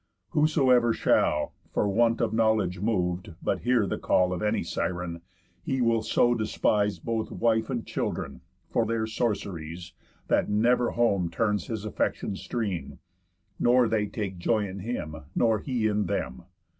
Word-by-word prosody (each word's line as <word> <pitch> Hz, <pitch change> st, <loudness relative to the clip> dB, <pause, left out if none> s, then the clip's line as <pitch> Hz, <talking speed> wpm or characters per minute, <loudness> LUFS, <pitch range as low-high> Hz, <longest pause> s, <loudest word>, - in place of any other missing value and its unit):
Whosoever 130 Hz, -6 st, +4 dB
shall, 75 Hz, -7 st, +2 dB, 0.2 s
For -, -, +2 dB
want 115 Hz, +3 st, +2 dB
of 110 Hz, -2 st, 0 dB
knowledge 110 Hz, -5 st, +2 dB
mov'd, 90 Hz, -5 st, -1 dB
but -, -, -1 dB
hear 120 Hz, -4 st, +2 dB
the 95 Hz, -, -3 dB
call 90 Hz, 0 st, +2 dB
Of 90 Hz, -, -4 dB
any 105 Hz, 0 st, 0 dB
Siren, 90 Hz, -1 st, -3 dB, 0.4 s
he 130 Hz, -, -2 dB
will 115 Hz, -2 st, +2 dB
so 120 Hz, +2 st, +3 dB
despise 105 Hz, -2 st, +1 dB
Both 115 Hz, -1 st, -3 dB
wife 115 Hz, -1 st, +1 dB
and 120 Hz, -4 st, -3 dB
children, -, -, -3 dB, 0.3 s
for 115 Hz, -, +2 dB
their 115 Hz, -1 st, 0 dB
sorceries, 90 Hz, -7 st, -3 dB, 0.3 s
That -, -, +2 dB
never 120 Hz, +3 st, +3 dB
home 100 Hz, -7 st, +1 dB
turns 105 Hz, +1 st, 0 dB
his 110 Hz, -2 st, -4 dB
affection's 100 Hz, -1 st, -2 dB
stream, 105 Hz, -8 st, -3 dB, 0.6 s
Nor 125 Hz, 0 st, +4 dB
they 110 Hz, -2 st, 0 dB
take 95 Hz, -4 st, -5 dB
joy 105 Hz, +3 st, +1 dB
in 95 Hz, +1 st, -7 dB
him, 90 Hz, -7 st, -4 dB, 0.2 s
nor 115 Hz, -2 st, +3 dB
he 125 Hz, -2 st, -2 dB
in 105 Hz, -2 st, +1 dB
them. 65 Hz, -6 st, -3 dB
110 Hz, 150 wpm, -27 LUFS, 95-115 Hz, 0.6 s, Whosoever